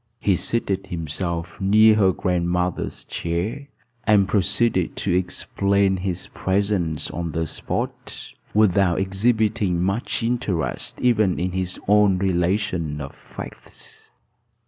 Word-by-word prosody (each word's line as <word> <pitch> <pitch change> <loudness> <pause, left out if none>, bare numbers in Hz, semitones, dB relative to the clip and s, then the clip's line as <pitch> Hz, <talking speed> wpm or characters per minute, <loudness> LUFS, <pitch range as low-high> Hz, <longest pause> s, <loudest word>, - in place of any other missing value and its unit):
He 100 - +2
seated 100 -1 -1
himself 85 +2 -2
near 110 +3 +6
her 100 -3 +4
grandmother's 90 -1 -1
chair, 100 +12 -3 0.4
and 100 -3 +5
proceeded 100 -1 +1
to 95 - -1
explain 95 +2 +1
his 90 -1 -2
presence 95 -5 -1
on 85 -2 -4
the 80 +1 -1
spot, - - -5 0.2
without 100 -4 +3
exhibiting 105 -1 +1
much 100 +6 -1
interest 115 -8 -2
even 110 -7 +2
in 90 +1 -1
his 90 0 -2
own 105 -2 +4
relation 90 -4 0
of 70 -2 -7
facts. - - -10
95 Hz, 110 wpm, -23 LUFS, 90-105 Hz, 0.4 s, near